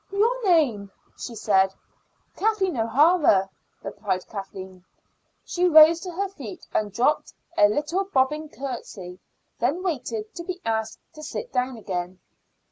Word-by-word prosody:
"Your 460 +5 +1
name?" 280 - +2 0.3
she 235 - -7
said. 195 -3 +2 0.6
"Kathleen 400 -5 +1
O'Hara," 240 - +3 0.3
replied 195 -3 -3
Kathleen. 190 -2 -8 0.6
She 360 0 +1
rose 315 +1 +8
to 365 +1 -6
her 395 +4 -2
feet 280 - -10
and 210 -1 0
dropped 250 +9 +1 0.2
a 205 - +6
little 305 - -1
bobbing 300 -2 0
curtsy, 215 -8 -7 0.4
then 285 +10 0
waited 235 - -3
to 340 - -7
be 365 +1 -5
asked 220 -1 -1 0.2
to 305 - -11
sit 460 +10 -6
down 250 0 -1
again. 185 -3 -5
260 Hz, 130 wpm, -25 LUFS, 205-340 Hz, 0.6 s, rose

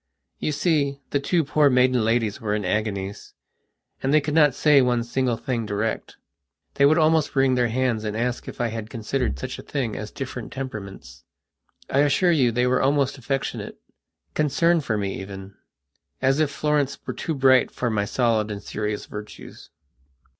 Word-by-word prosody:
You - - -1
see, 145 -3 0
the 140 - +2
two 165 +4 +1
poor 145 0 +3
maiden 125 -2 +3
ladies 115 -2 0
were 105 -2 -1
in 105 - -2
agoniesand 100 0 -3 0.7
they 140 +3 +3
could 150 0 -3
not 150 -4 +5
say 145 -2 +5
one 125 -2 +1
single 120 0 -1
thing 115 -3 -3
direct. 105 +2 -3 0.6
They 140 - +4
would 155 +3 +4
almost 155 -2 +2
wring 135 -1 +3
their 125 -1 +2
hands 120 -2 0
and 105 0 -3
ask 120 +1 -2
if - - -8
I 120 -1 0
had 110 -1 -6
considered 115 - -2
such - - -6
a - - -6
thing 125 -7 -3
as 110 - -5
different 130 -3 -6
temperaments. 100 - -8 0.6
I 135 - +1
assure 145 +5 +3
you 130 -7 +3
they 125 +2 +1
were 125 0 +2
almost 140 0 +1
affectionate, 135 +2 -3 0.6
concerned 165 +2 +2
for 115 -5 -1
me 100 -1 -3
even, 95 0 -9 0.7
as 135 +2 +2
if 155 -2 +2
Florence 145 -1 0
were - - -3
too 160 - -3
bright 130 -1 +4
for 120 -2 -2
my 105 -2 0
solid 115 -2 +1
and 100 -1 -6
serious 105 0 -3
virtues. 105 0 -10
125 Hz, 175 wpm, -24 LUFS, 110-140 Hz, 0.7 s, not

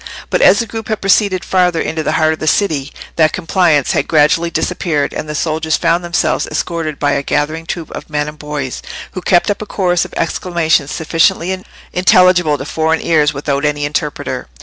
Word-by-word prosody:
But - - +1
as - - +6
the 230 - 0
group 225 0 -7
had 215 - -2
proceeded 195 -1 +2
farther 180 -3 +2
into 160 0 -2
the - - -1
heart 160 0 +2
of 155 - -8
the 155 - -4
city, 150 -6 +1 0.3
that 155 -2 +3
compliance 165 -5 +2
had - - 0
gradually 165 +2 +3
disappeared, 160 -3 -1
and 150 - -5
the 150 - -4
soldiers 160 0 0
found 170 +1 +1
themselves 170 0 0
escorted 165 -4 -3
by 145 - +1
a 140 - 0
gathering 155 +3 -2
troop 165 -2 -5
of - - -8
men 150 -1 -1
and 150 0 -9
boys, 150 -3 -5 0.3
who 185 - -6
kept 175 +2 +2
up 205 - -4
a 215 - -6
chorus 180 -4 +1
of - - -9
exclamations 165 -4 0
sufficiently 180 +3 0 0.3
intelligible 180 -4 +4
to 135 - -6
foreign 160 +2 0
ears 150 -3 +3
without 140 0 -2
any 145 -1 0
interpreter. 145 0 -3
160 Hz, 195 wpm, -15 LUFS, 150-180 Hz, 0.3 s, as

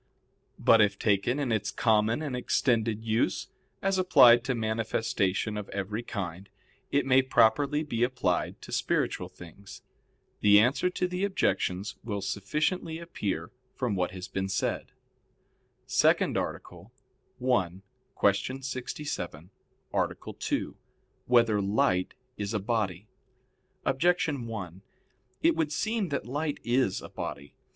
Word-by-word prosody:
But 115 -1 +5
if 100 -1 +3
taken 105 +5 +1
in 140 -4 -1
its 110 -2 0
common 110 +4 +2
and 140 -4 -3
extended 115 -3 +1
use, 110 0 0 0.3
as 195 -1 +2
applied 125 -10 +7
to 130 -1 0
manifestation 110 -2 -1
of 105 - -6
every 100 +3 -3
kind, 95 -5 -6 0.4
it 140 -1 +1
may 130 0 +5
properly 140 +4 +3
be 120 -6 -3
applied 120 -8 0
to - - -10
spiritual - - 0
things. 95 +3 -13 0.6
The 105 0 +7
answer 130 +10 +3
to 180 0 -1
the 180 +1 -3
objections 100 - 0
will 100 -4 -3
sufficiently 150 - -1
appear 100 - -4 0.2
from 125 -5 -1
what 90 -1 0
has 90 0 -7
been 95 0 -3
said. 100 - -1
_______________________ - - -31 0.9
SECOND - - +3
ARTICLE 90 +5 -5 0.5
[I, 125 -8 +2 0.5
Q. 130 +1 +1
67, 125 - -5 0.4
Art. - - 0 0.2
2] - - -2 0.5
Whether 115 -4 +4
Light 95 -2 +1 0.2
Is 105 +1 -3
a - - +1
Body? 105 -3 -2 0.8
Objection 155 -5 +1
1: 95 -5 -6 0.6
It 335 0 +4
would 155 -2 0
seem 215 +3 -1
that 140 - -2
light 145 +4 -2
is 120 -4 +1
a - - -8
body. 70 +1 -6
115 Hz, 130 wpm, -28 LUFS, 100-135 Hz, 0.9 s, applied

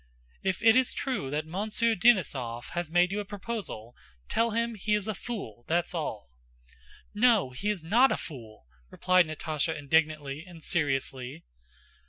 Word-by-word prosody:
"If 190 +1 -1
it 225 0 +7
is 255 -1 +3
true 255 - -2
that 150 +2 -2
Monsieur 215 +7 0
Denísov 145 - +2
has 175 -1 -3
made 175 +2 +3
you 205 - -1
a - - -2
proposal, 200 - -6 0.3
tell 230 +1 +1
him 230 +1 0
he 210 0 0
is 210 -1 -2
a 215 - -1
fool, 195 - -7
that's 170 +2 0
all!" 110 - -4 0.8
"No, 215 - +4
he's 195 +6 -2
not 235 +11 +4
a - - +1
fool!" 115 - -10 0.2
replied 185 -2 +3
Natásha 155 -1 -2
indignantly 150 -1 0
and 175 -3 -13
seriously. 135 -2 -1
175 Hz, 150 wpm, -29 LUFS, 145-210 Hz, 0.8 s, it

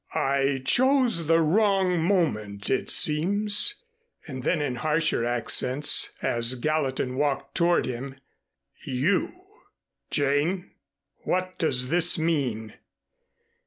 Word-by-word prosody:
"I 135 -1 0
chose 250 - +2
the 165 +1 +4
wrong 190 0 +2
moment 110 - -1
it 130 - -1
seems," 205 - 0 0.4
and 130 -5 -7
then 160 +6 0
in 135 -4 -2
harsher 155 -4 0
accents 120 +4 0
as 120 +2 +1
Gallatin 130 -2 -2
walked 145 -1 -1
toward 175 0 +2
him. 130 +2 -6 0.7
"You! 145 +9 0 0.8
Jane, 150 +6 0 0.5
what 185 0 -3
does 125 -5 +1
this 175 +1 +3
mean?" 130 -10 -2
150 Hz, 100 wpm, -25 LUFS, 130-175 Hz, 0.8 s, the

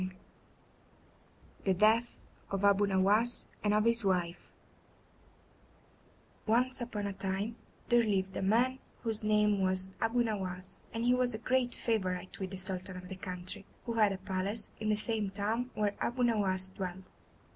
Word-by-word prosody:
] - - -30
The 190 -1 +2
Death 220 +5 +3 0.3
Of 195 0 0
Abu 200 0 +5
Nowas 200 +5 +3 0.2
And 205 - +3
Of 210 +1 +3
His 230 0 +3
Wife 180 -3 -1 2.0
Once 250 +4 +3
upon 225 -4 -3
a 200 - -2
time 195 +4 -2 0.3
there 240 0 +6
lived 190 -4 0
a - - -2
man 240 +7 +2 0.2
whose 225 -2 +1
name 210 -1 +3
was 185 0 0
Abu 235 +2 +2
Nowas, 185 -4 -3
and 230 - -3
he 245 +1 +4
was 250 -2 +1
a - - -2
great 250 +2 +1
favourite 185 -5 -2
with 190 -1 -3
the 190 - -6
Sultan 185 0 -2
of 180 0 -9
the 190 - -5
country, 185 +1 -4 0.2
who 235 - -2
had 215 -3 +4
a 195 - -3
palace 195 +4 -2
in 215 0 -1
the 210 - +3
same 215 -2 -1
town 220 +5 -1
where 210 -1 +1
Abu 245 +1 0
Nowas 195 -5 +2
dwelt. 185 -1 -5
205 Hz, 160 wpm, -32 LUFS, 190-230 Hz, 2.0 s, there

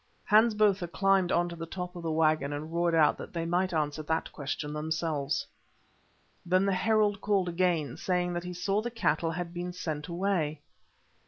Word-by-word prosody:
Hans 220 +1 +5
Botha 205 -4 +3
climbed 195 +1 +2
on 175 0 +2
to 170 - -7
the 165 0 -6
top 180 +1 -6
of 175 - -7
a 165 - -1
waggon 155 -2 +2
and 155 +3 -6
roared 170 0 +2
out 155 -2 +4
that - - -8
they 165 -1 -2
might 180 +2 +1
answer 155 -2 -1
that 160 +1 -2
question 150 +1 -4
themselves. 155 -2 -1 1.0
Then 185 +2 +2
the 200 - +2
herald 210 +1 +2
called 200 -3 +1
again, 170 -6 0
saying 180 -1 0
that 175 0 -3
he 180 0 -5
saw 195 +4 0
the 240 - -3
cattle 170 -8 0
had 170 +1 -4
been 175 +1 -4
sent 155 -4 -4
away. 170 -4 -1
175 Hz, 185 wpm, -29 LUFS, 155-185 Hz, 1.0 s, Hans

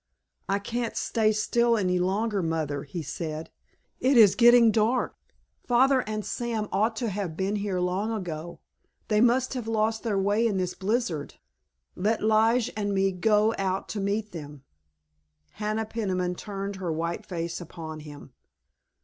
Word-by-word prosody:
"I 195 - +2
can't 230 +3 -3
stay 220 -2 +2
still 235 +2 +2
any 180 -3 +1
longer, 200 +3 0
Mother," 155 -4 -2
he 160 +4 -5
said. 155 +1 -5 0.5
"It 260 0 +3
is 210 -4 +8
getting 240 -1 +7
dark. 225 +3 +1 0.5
Father 260 +2 +4
and 215 -1 -3
Sam 230 -3 -2
ought 220 +3 +1
to 230 0 -2
have 190 -5 -4
been 195 +2 0
here 200 -3 -2
long 185 +5 -1
ago; 170 -6 -5 0.5
they 210 -1 +3
must 245 +2 +3
have 245 -4 -4
lost 220 0 0
their 215 -4 -1
way 205 +4 +2
in 205 -4 -1
this 180 -1 -1
blizzard. 195 - -2 0.6
Let 215 +4 0
Lige 220 +2 +3
and 205 -1 -1
me 195 0 +2
go 210 +3 +2
out 190 0 -1
to 210 - -3
meet 205 +2 -1
them." 145 -4 -9 0.9
Hannah 215 +1 -2
Peniman 185 -5 -2
turned 200 +1 -5
her 180 -3 -3
white 170 +5 -2
face 170 -4 -4
upon 160 -2 -8
him. 145 -3 -11
205 Hz, 155 wpm, -27 LUFS, 180-225 Hz, 0.9 s, is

